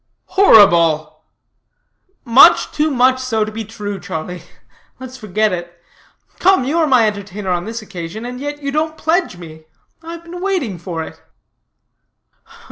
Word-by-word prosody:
"Horrible!" 175 - +4 1.0
"Much 240 +1 +6
too 305 +1 0
much 260 -1 +2
so 225 -4 -1
to 215 - -7
be 220 +1 -5
true, 205 -2 -6
Charlie. 175 +1 -6 0.6
Let 260 -1 -9
us 260 - -11
forget 215 -2 -1
it. 175 -1 -7 0.6
Come, 380 -6 +3
you 295 +6 -1
are 320 - +2
my 255 -5 +4
entertainer 200 -2 -4
on 175 -1 -1
this 225 0 -6
occasion, 180 +3 -7
and 250 0 -7
yet 290 +1 -6
you 280 - -2
don't 310 +2 -2
pledge 330 - -1
me. 160 -2 -12 0.4
I 330 +1 -8
have 335 0 -10
been 350 +1 -9
waiting 350 - -2
for 165 -1 -5
it." - - -12
225 Hz, 155 wpm, -17 LUFS, 180-290 Hz, 1.0 s, Much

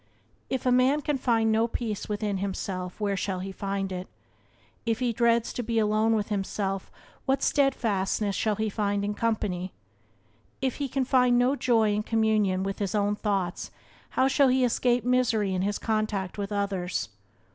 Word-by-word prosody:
If 260 -1 -2
a 250 - +3
man 255 +4 +4
can 290 -1 -1
find 225 -3 +2
no 225 +1 +3
peace 225 -4 -4
within 205 -2 -1
himself 185 -1 -4
where 205 -2 0
shall 190 0 -2
he 190 +1 -5
find 195 0 -3
it? 180 0 -5 0.8
If 225 -1 0
he 245 -1 0
dreads 235 0 +2
to - - -2
be 230 0 -2
alone 215 +1 +3
with 210 0 -1
himself 195 -1 -2 0.4
what 270 0 +1
steadfastness 215 -7 +1
shall 215 -1 +1
he 220 +1 -1
find 205 -1 -1
in 205 - -1
company? 200 -5 -2 0.9
If 260 -2 -1
he 285 - -2
can 265 +1 0
find 250 -1 +4
no 250 +3 +3
joy 225 -6 +2
in 210 - 0
communion 215 -4 +1
with 195 0 -3
his 200 -1 -1
own 205 0 +1
thoughts 195 -5 -2 0.5
how 260 - +5
shall 275 +1 +4
he 255 0 +3
escape 245 0 +1
misery 235 -6 +2
in 185 - 0
his 205 +2 0
contact 215 -4 -1
with 200 0 -4
others? 190 - -2
215 Hz, 175 wpm, -27 LUFS, 195-240 Hz, 0.9 s, how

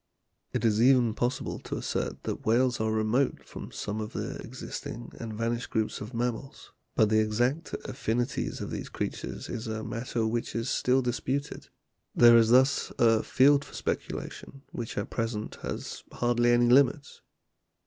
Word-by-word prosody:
It - - -1
is 110 -1 +3
even 125 -3 +5
possible 120 +3 -2
to - - -5
assert - - -3
that - - -4
whales 120 +2 +2
are 110 0 +1
remote 110 +5 +1
from - - -8
some 105 +1 -4
of 105 - -6
the - - -4
existing 120 +1 -7
and 115 -1 -5
vanished 115 +2 -2
groups 110 -2 -1
of 105 - -6
mammals, 120 +3 -4 0.2
but 110 - +4
the 110 0 +4
exact 120 +9 0
affinities 120 +1 -2
of - - -5
these - - -5
creatures - - -4
is 120 0 -5
a 110 0 -3
matter 115 0 -2
which 115 +1 -2
is 115 +2 -1
still 130 +1 +2
disputed; 130 +4 -2 0.5
there 120 -1 +8
is 115 -1 +6
thus 130 +3 +4
a 115 -2 +4
field 140 +2 +4
for - - -13
speculation 135 0 -5
which 115 -2 -5
at 100 - -3
present 115 -2 -3
has - - -5
hardly 120 0 +2
any 120 0 +4
limits. 140 +2 +3
120 Hz, 160 wpm, -28 LUFS, 110-125 Hz, 0.5 s, there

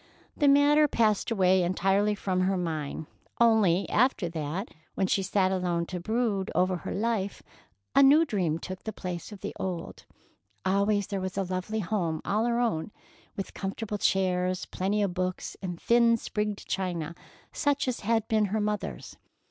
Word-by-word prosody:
The 290 - +2
matter 290 +2 +5
passed 220 -6 +1
entirely 190 0 +2
from 190 -2 -1
her 190 +1 +1
mind, 160 -3 -3 0.3
only, 215 -6 +4
after 230 -7 +2
that, 165 +5 -4 0.3
when 190 - +1
she 195 - +1
sat 190 0 +1
alone 175 -2 0
to 180 +1 -5
brood 215 0 -1
over 185 0 +2
her - - -6
life, 210 -2 -1 0.5
a 275 - +7
new 290 +4 +7
dream 180 - 0
took 185 +2 -7
the 220 - -4
place 180 +1 -6
of 205 - -10
the - - -5
old. 180 -3 -5 0.6
Always 200 +1 +2
there 195 0 -3
was 185 0 -4
a 195 - +1
lovely 185 +4 -3
home 170 -5 -1
all 215 +3 +1
her 240 0 +1
own, 210 -7 -1 0.5
with 195 - -5
comfortable 205 +2 -4
chairs 185 -1 +1
and - - -11
plenty 205 +3 0
of 195 -3 -1
books, 185 0 -3
and 175 -3 -5
thin, 235 0 +4
sprigged 210 -2 -3
china, 175 -4 -2 0.4
such 285 -2 0
as 250 -1 -1
had 225 +1 0
been 215 -1 +2
her 210 +2 -1
mother's. 210 0 -3
195 Hz, 165 wpm, -28 LUFS, 185-220 Hz, 0.6 s, a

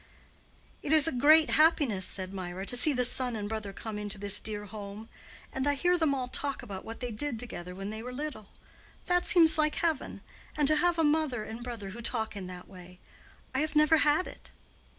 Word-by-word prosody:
"It 290 - -4
is 310 -1 +7
a - - +1
great 305 +5 +4
happiness," 290 - +3
said 185 0 -3
Mirah, 185 0 -6
"to 245 - +2
see 275 +5 +6
the 250 -2 +2
son 250 0 +2
and 205 -1 -4
brother 215 -2 -5
come 210 +2 -7
into 205 0 -2
this 205 0 +3
dear 210 -1 -5
home. 210 +1 -9 0.4
And 265 +1 -2
I 285 - +2
hear 355 +5 +2
them 320 -5 +1
all 255 -2 -3
talk 280 +2 -1
about 195 -2 -8
what 225 +3 -9
they 245 -1 -4
did 240 +3 -3
together 180 -6 -8
when 195 +2 -6
they 220 +1 -7
were 250 +2 -7
little. 260 -6 -6 0.6
That 355 0 +1
seems 320 -3 +5
like 305 0 +2
heaven, 325 -5 -2 0.4
and 295 -2 +2
to 310 +1 +4
have 345 +2 +2
a 325 - +2
mother 295 -6 +1
and 225 +3 -8
brother 230 -5 -7
who 235 +4 -9
talk 220 -2 -2
in 190 -2 -6
that 180 -1 -10
way. 180 -1 -14 0.6
I 265 - 0
have 305 +1 -2
never 305 +1 +5
had 300 +4 +2
it." - - -12
245 Hz, 215 wpm, -29 LUFS, 205-300 Hz, 0.6 s, is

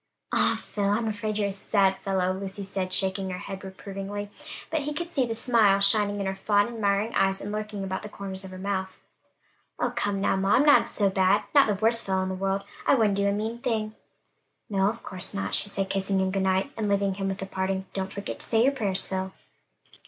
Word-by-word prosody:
"Ah, - - +3
Phil, 205 -1 -3
I'm 210 +3 +1
afraid 215 0 -2
you're 205 -1 +1
a - - -3
sad 195 0 +2
fellow!" 185 -1 0
Lucy 195 +1 -5
said, 190 -1 -3
shaking 190 0 0
her 180 - -4
head 195 +1 -7
reprovingly; 195 +1 -6 0.4
but 320 -2 +1
he 295 +1 -3
could 345 +2 -4
see 260 -4 +2
the 225 - -3
smile 225 -4 +4
shining 205 0 +3
in 200 - -2
her 190 - -1
fond, 205 +2 +2
admiring 215 -1 0
eyes, 195 0 +2
and 205 - -5
lurking 210 -1 -4
about 190 0 -3
the 210 - -8
corners 195 -1 -7
of 190 - -7
her 185 - -9
mouth. 190 0 -3 0.8
"Oh, 245 - 0
come 205 -4 0
now, 195 - +2
ma, 195 +1 +3
I'm 280 - +4
not 290 - +6
so 200 -2 +2
bad; 190 +2 +3
not 280 -4 +6
the 210 - +1
worst 225 +3 +2
fellow 190 -1 +1
in 185 - -2
the - - -2
world. 195 +1 -1 0.2
I - - +6
wouldn't 215 -5 +3
do 200 0 +1
a - - +3
mean 220 +3 -2
thing." 220 -4 -1 0.8
"No, 195 0 +3
of 230 +2 -6
course 185 -2 -5
not," 95 0 -2
she 205 - +3
said, 195 -1 -2
kissing 195 0 0
him 190 0 +1
good 195 0 0
night, 190 +7 +1
and 215 -2 -1
leaving 200 -1 +2
him 195 0 -3
with 195 0 -3
a - - -3
parting, 190 0 -2
"Don't 190 0 -3
forget 200 0 -5
to - - -2
say 225 0 +3
your 270 - +4
prayers, 200 -8 0
Phil." 190 0 -3
200 Hz, 235 wpm, -27 LUFS, 190-215 Hz, 0.8 s, not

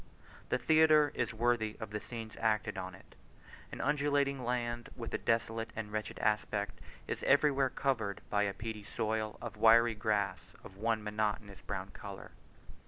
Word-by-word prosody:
The - - +2
theatre 155 +2 +5
is 120 - -1
worthy 115 -1 +1
of 110 -3 -6
the 105 - -2
scenes 110 -1 -7
acted 110 -2 +1
on 95 -1 -5
it. - - -18 0.6
An - - -7
undulating 140 -2 +1
land, 120 -1 -2
with 115 -2 -6
a - - 0
desolate 115 0 0
and 110 -2 -4
wretched 110 0 -3
aspect, 105 -1 0 0.3
is - - -3
everywhere 140 -1 +4
covered 115 -8 -1
by 105 - +3
a 100 -1 +1
peaty 110 -1 -5
soil 110 +1 -2
and 115 -3 -5
wiry 115 +2 +6
grass, 105 -3 -1
of 95 - -11
one 110 +1 0
monotonous 105 -1 -2
brown 95 -1 -5
colour. 100 -2 -9
110 Hz, 160 wpm, -33 LUFS, 105-120 Hz, 0.6 s, wiry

